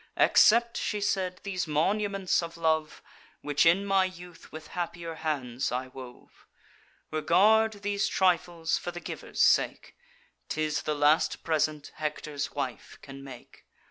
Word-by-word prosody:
'Accept,' 235 Hz, +1 st, +5 dB
she 210 Hz, -, -2 dB
said, 190 Hz, -2 st, -1 dB
'these 185 Hz, -4 st, -3 dB
monuments 195 Hz, +5 st, +1 dB
of 170 Hz, 0 st, -7 dB
love, 160 Hz, -2 st, 0 dB, 0.4 s
Which 145 Hz, +2 st, +2 dB
in 185 Hz, +4 st, +4 dB
my 195 Hz, -1 st, +3 dB
youth 180 Hz, -2 st, -9 dB
with 155 Hz, 0 st, -10 dB
happier 170 Hz, -1 st, -5 dB
hands 140 Hz, -6 st, -3 dB
I 130 Hz, +1 st, -3 dB
wove: 125 Hz, -1 st, -13 dB, 0.6 s
Regard 205 Hz, +7 st, +3 dB
these 205 Hz, 0 st, 0 dB
trifles 175 Hz, -3 st, +1 dB
for -, -, -5 dB
the 175 Hz, 0 st, -6 dB
giver's -, -, -3 dB
sake; -, -, +2 dB, 0.5 s
'Tis 155 Hz, -1 st, -1 dB
the 150 Hz, -, -2 dB
last 150 Hz, +2 st, +2 dB
present 155 Hz, -2 st, -1 dB
Hector's 150 Hz, -2 st, -4 dB
wife 130 Hz, -6 st, -5 dB
can 135 Hz, 0 st, -10 dB
make. 130 Hz, -3 st, -13 dB
165 Hz, 135 wpm, -28 LUFS, 150-190 Hz, 0.6 s, Accept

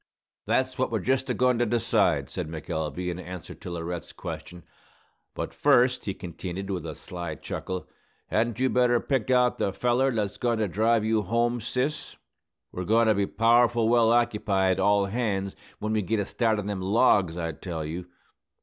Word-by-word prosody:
"That's 130 Hz, 0 st, 0 dB
what 130 Hz, -, +1 dB
we're 115 Hz, -, +1 dB
just 130 Hz, +6 st, 0 dB
a -, -, +2 dB
goin' 125 Hz, -1 st, +2 dB
to 120 Hz, -, +3 dB
decide," 115 Hz, 0 st, +2 dB
said -, -, -5 dB
McElvey, 80 Hz, +2 st, -3 dB
in 85 Hz, -, -6 dB
answer 90 Hz, -1 st, -8 dB
to -, -, -9 dB
Laurette's 85 Hz, 0 st, -5 dB
question. 90 Hz, -1 st, -8 dB, 0.7 s
"But -, -, -4 dB
first," 125 Hz, +1 st, +3 dB
he 100 Hz, -, -3 dB
continued, 90 Hz, +2 st, -6 dB
with 90 Hz, -4 st, -3 dB
a 80 Hz, -, -6 dB
sly 85 Hz, -3 st, -6 dB
chuckle, 90 Hz, +4 st, -5 dB, 0.4 s
"hadn't 120 Hz, +1 st, 0 dB
you 130 Hz, -, +3 dB
better 125 Hz, -1 st, +3 dB
pick 130 Hz, -3 st, -1 dB
out 125 Hz, -1 st, +3 dB
the 100 Hz, -, +1 dB
feller 125 Hz, +6 st, +1 dB
that's 105 Hz, -5 st, -2 dB
goin' 120 Hz, -2 st, 0 dB
to 110 Hz, -1 st, 0 dB
drive 110 Hz, +3 st, +2 dB
you 110 Hz, -1 st, +2 dB
home, 120 Hz, +4 st, 0 dB
sis? 130 Hz, +6 st, -3 dB, 0.5 s
We're 90 Hz, -, -4 dB
goin' 115 Hz, +5 st, +3 dB
to -, -, +6 dB
be 100 Hz, -1 st, 0 dB
powerful 115 Hz, +1 st, +3 dB
well 115 Hz, -1 st, +4 dB
occupied, 100 Hz, -5 st, +2 dB
all 100 Hz, +1 st, +3 dB
hands, 100 Hz, -3 st, -2 dB, 0.2 s
when 110 Hz, +1 st, -2 dB
we 110 Hz, -, +2 dB
git 110 Hz, +3 st, -1 dB
a 100 Hz, -, 0 dB
start 110 Hz, +1 st, 0 dB
on 105 Hz, -, -3 dB
them 100 Hz, -2 st, -3 dB
logs, 95 Hz, -4 st, +3 dB
I 85 Hz, -1 st, -2 dB
tell 80 Hz, 0 st, -5 dB
you!" 85 Hz, +3 st, -5 dB
105 Hz, 185 wpm, -26 LUFS, 90-120 Hz, 0.7 s, to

